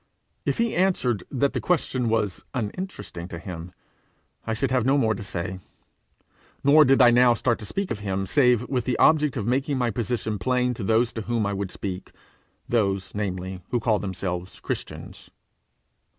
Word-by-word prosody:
If - - +1
he 230 -1 +1
answered 130 - +1
that 140 +1 0
the - - -2
question 130 -8 0
was 105 -4 0
uninteresting 110 - -5
to 85 - -7
him, 85 0 -7 0.8
I 110 - 0
should 130 +4 -1
have 130 -2 +2
no 135 +4 +3
more 110 -5 +2
to - - -6
say; 95 -1 -4 1.0
nor 150 +2 +7
did 135 0 +4
I 120 - +8
now 120 0 +5
start 115 +1 0
to 105 - -7
speak 195 - -3
of 110 - -2
him 95 -1 -2
save 125 +1 +3
with 130 -3 -1
the 125 - 0
object 150 -3 +4
of 105 - -2
making 135 +3 0
my 125 -2 +1
position 110 -1 -2
plain 125 +4 +1
to 115 - -6
those 115 +3 +2
to 110 - -4
whom 115 0 -1
I 100 - -1
would 100 -1 -3
speak 90 -1 -6 0.5
those, 100 -5 0
namely, 95 -2 -3
who 120 - +1
call 110 -2 +1
themselves 95 -2 -4
Christians. - - -6
115 Hz, 180 wpm, -25 LUFS, 100-130 Hz, 1.0 s, I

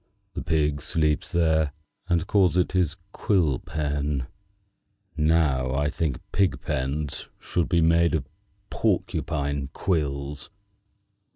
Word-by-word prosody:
The - - -4
pig 75 -2 +1
sleeps 75 +3 0
there, 80 -4 +2 0.4
and 85 -1 +2
calls 95 -3 +3
it 90 - +2
his 90 -4 +1 0.2
quill 85 - +1
pen. 75 -2 -2 0.9
Now 75 -5 +2
I 75 +1 +1
think 75 -4 -1
that - - -16
pigpens 75 -6 -1
should 85 -3 -1
be 85 -1 +3
made 85 +1 +4
of - - -2 0.4
porcupine 70 -1 -1
quills." 70 -4 -2
75 Hz, 110 wpm, -26 LUFS, 70-85 Hz, 0.9 s, made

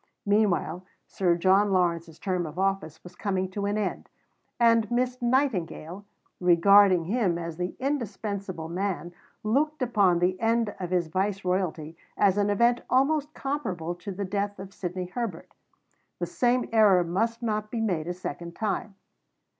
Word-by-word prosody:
Meanwhile 200 -4 +1 0.2
Sir 180 -3 +1
John 195 +4 +3
Lawrence's 170 -3 0
term 180 -1 -2
of 155 +2 -10
office 195 -4 -1
was 180 0 -12
coming 190 -1 -2
to 200 +1 -2
an 205 +1 0
end; 215 - -3 0.5
and 230 -2 +4
Miss 250 +1 -1
Nightingale, 205 - -1 0.3
regarding 185 +1 +6
him 195 -3 +1
as 165 -1 -5
the 180 0 -3
indispensable 200 - -3
man, 180 0 -3 0.3
looked 285 +7 +1
upon 205 -8 +3
the 180 +2 +1
end 225 -2 +1
of 180 -2 -4
his 180 -1 +1
viceroyalty 185 -3 -1 0.2
as 200 0 +3
an 205 0 +2
event 235 +4 +3
almost 290 +3 +2
comparable 190 - -3
to 180 +4 -8
the 200 +1 -4
death 200 +1 -2
of 195 0 -9
Sidney 180 -1 -4
Herbert. 190 -2 -5 0.6
The - - -2
same 245 0 +1
error 205 -5 +5
must 225 +7 -1
not 215 -2 -1
be 230 - -3
made 180 -8 -1
a 175 - -2
second 170 -1 -6
time. 210 -1 -2
195 Hz, 150 wpm, -27 LUFS, 180-225 Hz, 0.6 s, regarding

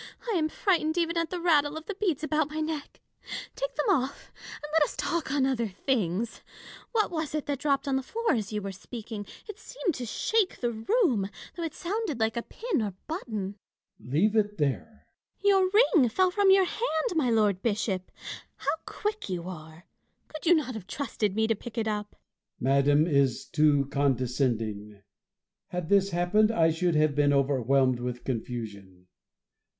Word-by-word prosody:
I - - 0
am 310 -3 +1
frightened 335 -3 +1
even 335 0 +1
at 335 -1 0
the 360 - -3
rattle 305 -3 +3
of 315 - -8
the 410 - -4
beads 365 -7 -1
about 310 -1 +1
my 310 +1 -4
neck: 310 -2 -4 0.6
take - - -3
them - - -1
off, 280 -7 -1 0.2
and 295 0 -9
let 320 - +4
us 295 - +1
talk 335 -5 -1
on 275 -2 +2
other 245 -4 0
things. 215 -1 -1 0.5
What 435 -4 +1
was 315 -3 -3
it 305 - -2
that 285 -2 -2
dropped 280 -1 0
on 270 -1 +2
the - - -1
floor 450 - -1
as 220 -3 -2
you 210 -1 -3
were 195 - -4
speaking 210 +1 -7
% - - -24
It 425 - -8
seemed 395 -8 -3
to 250 -3 -5
shake 430 - 0
the 240 -1 0
room, 230 - +1 0.3
though 345 - -6
it 325 -2 -3
sounded 370 - -3
like 220 0 +1
a 235 - -1
pin 455 - -2
or 205 -4 -3
button. 215 - -4 0.4
Bossuet. 125 - -12
Leave 205 +10 +3
it 210 -1 +1
there! 150 - -2 0.3
Fontanges. - - -38
Your 385 -2 +4
ring 375 - +5
fell 370 +9 +2
from 400 +1 +3
your 385 0 +6
hand, 345 -6 -1
my 305 -7 +2
Lord 210 -4 +2
Bishop! 200 -4 -1 0.4
How - - -1
quick 420 - -3
you 180 -1 -3
are! 160 -1 -9 0.5
Could 325 +2 +3
not 300 -5 -1
you 255 - -5
have 220 -5 -8
trusted 215 -8 -2
me 220 0 +2
to 225 - +2
pick 235 +3 -10
it 225 -1 0
up? 210 -1 -3
Bossuet. - - -38 0.7
Madame 145 +2 +5
is 140 -4 +2
too 145 -1 +3
condescending: 120 -6 -1 0.6
had 180 -2 -4
this 200 -1 +4
hap 175 0 -1
pened, 215 0 +6
I 165 -7 +3
should 170 +1 0
have 155 -1 +3
been 145 0 +3
overwhelmed 135 -2 +2
with 125 0 -4
confusion. 105 -7 -5
225 Hz, 190 wpm, -28 LUFS, -, 0.7 s, your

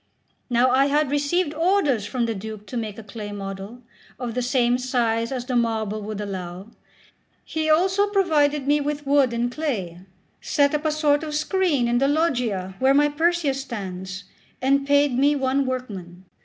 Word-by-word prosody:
Now 245 +1 +3
I 270 +2 +4
had 295 0 +1
received 290 +3 0
orders 315 - +1
from 240 +2 -1
the 230 - -1
Duke 215 +1 -7
to 250 - -9
make 220 -3 -4
a 225 - -8
clay 210 0 -7
model, 200 +4 -7 0.4
of 245 -3 -4
the 250 - -1
same 245 0 +2
size 235 -2 0
as 250 -2 -3
the 250 -1 -2
marble 220 -3 0
would 210 0 -5
allow; 190 0 -6 0.7
he 315 0 -2
also 380 +6 +3
provided 300 -8 +2
me 295 +1 +3
with 290 0 -3
wood 275 -2 +3
and 235 +1 -1
clay, 220 - -3 0.4
set 285 0 +2
up 300 +1 -1
a 310 - +2
sort 300 -1 +2
of 305 -1 -4
screen 310 -5 +1
in 240 0 +2
the 275 - +3
Loggia 245 - 0
where 265 +1 +4
my 295 +1 +4
Perseus 300 -3 +1
stands, 190 -6 -6 0.4
and 275 +1 +2
paid 285 -2 +3
me 285 +3 +3
one 270 0 0
workman. 190 -9 -6
255 Hz, 175 wpm, -23 LUFS, 220-290 Hz, 0.7 s, I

